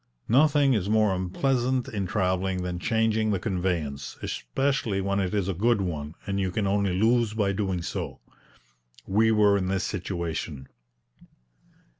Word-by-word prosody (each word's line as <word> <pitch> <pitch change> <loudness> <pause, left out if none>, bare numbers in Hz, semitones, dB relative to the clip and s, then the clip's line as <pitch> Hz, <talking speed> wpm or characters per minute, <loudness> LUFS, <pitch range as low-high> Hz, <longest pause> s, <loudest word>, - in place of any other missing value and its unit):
Nothing 140 +2 +4
is 100 -4 0
more 110 -2 +3
unpleasant 125 +7 0
in 100 -3 -3
travelling 95 -1 0
than 90 -1 -3
changing 110 +1 +1
the 100 -3 +1
conveyance, 85 - -2
especially 110 - -1
when 100 +1 0
it 95 -2 -1
is 100 -3 0
a 95 - 0
good 110 +5 +2
one, 80 -4 -4
and 100 0 -2
you 95 -1 0
can 100 +3 -1
only 100 -2 +1
lose 115 0 +2
by 105 -3 +1
doing 95 -3 -2
so. - - -5 0.9
We 110 +3 +3
were 105 -2 +4
in 95 - -2
this 95 0 0
situation. 85 -8 -4
100 Hz, 150 wpm, -26 LUFS, 90-110 Hz, 0.9 s, Nothing